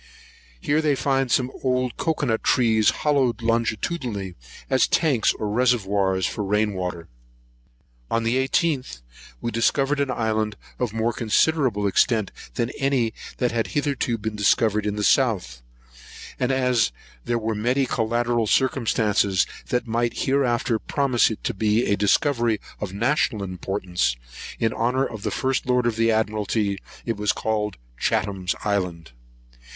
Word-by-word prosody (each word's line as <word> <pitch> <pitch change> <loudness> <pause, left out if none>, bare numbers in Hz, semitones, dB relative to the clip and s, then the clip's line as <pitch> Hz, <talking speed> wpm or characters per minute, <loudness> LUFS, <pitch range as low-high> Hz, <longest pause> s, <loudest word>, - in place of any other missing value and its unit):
Here 150 - +1
they 150 -2 +2
find 135 -1 0
some 125 +1 +1
old 125 -2 0
cocoa 145 -7 0
trees 110 -4 +3
hollowed 130 -6 +1
longitudinally, 115 - -1 0.3
as 130 -1 +3
tanks 145 -9 +2
or 105 - -4
reservoirs 100 -5 +1
for - - -3
the 100 - -3
rain 105 +1 +1
water. 90 -3 -4 1.0
On 115 - 0
the 115 +3 +1
18th, 130 - 0 0.4
we 120 - -2
discovered 135 +5 +1
an 140 -1 0
island 110 -3 -1 0.2
of 125 -4 -1
more 115 +2 0
considerable 120 -2 +1
extent 105 +2 +2 0.2
than 115 +2 -1
any 135 -5 +1
island - - -13
that 125 -2 0
has 115 -1 -2
hitherto 140 -5 0
been 110 0 -4
discovered 105 +1 +2
in 105 - -1
the 105 - -2
south; 95 - +2 0.8
and 125 +1 +1
as 125 - +2 0.3
there 120 - 0
were 110 -1 -2
many 125 +6 +1
collateral 120 -1 0
circumstances 110 -6 +2 0.2
which 125 - 0
might 115 0 -1
hereafter 130 -3 +1
promise 135 -2 +2
it 110 - -6
to - - -1
be 110 +3 +1
a 100 - +2
discovery 115 +2 +2 0.2
of 105 -3 -4
national 115 0 0
importance, 90 -5 -2 0.4
in 115 -1 0
honour 125 +3 +1
of 110 -5 -7
the - - -2
first 130 -1 -1
lord 125 -1 +2
of 120 -2 +1
the 115 0 +2
admiralty, 105 -2 0 0.3
it 115 -3 -2
was 105 0 +1
called 105 -1 -2 0.2
Chatham's 95 -2 0
Island. 90 -6 -2
115 Hz, 145 wpm, -23 LUFS, 105-130 Hz, 1.0 s, trees